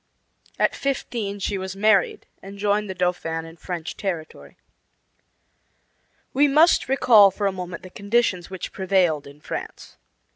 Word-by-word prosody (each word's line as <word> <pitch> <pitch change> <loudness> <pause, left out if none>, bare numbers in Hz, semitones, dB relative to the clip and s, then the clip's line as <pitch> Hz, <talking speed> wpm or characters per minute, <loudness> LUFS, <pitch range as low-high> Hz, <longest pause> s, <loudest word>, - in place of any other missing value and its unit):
At - - +2
fifteen 235 -7 -3
she 200 0 -2
was 190 0 -5
married 200 -2 +2 0.2
and 195 +1 -10
joined 205 0 0
the 190 - -4
Dauphin 175 -2 -2
in 165 0 -12
French 175 -1 -6
territory. 175 -6 -6 1.8
We 285 +2 +4
must 305 0 +4
recall 225 -6 +6
for 200 +2 -4
a 195 - +2
moment 180 -2 -7
the 185 - -11
conditions 200 -4 0
which 190 -2 -6
prevailed 180 -6 +1
in 140 +1 -15
France. - - -7
195 Hz, 140 wpm, -23 LUFS, 180-210 Hz, 1.8 s, recall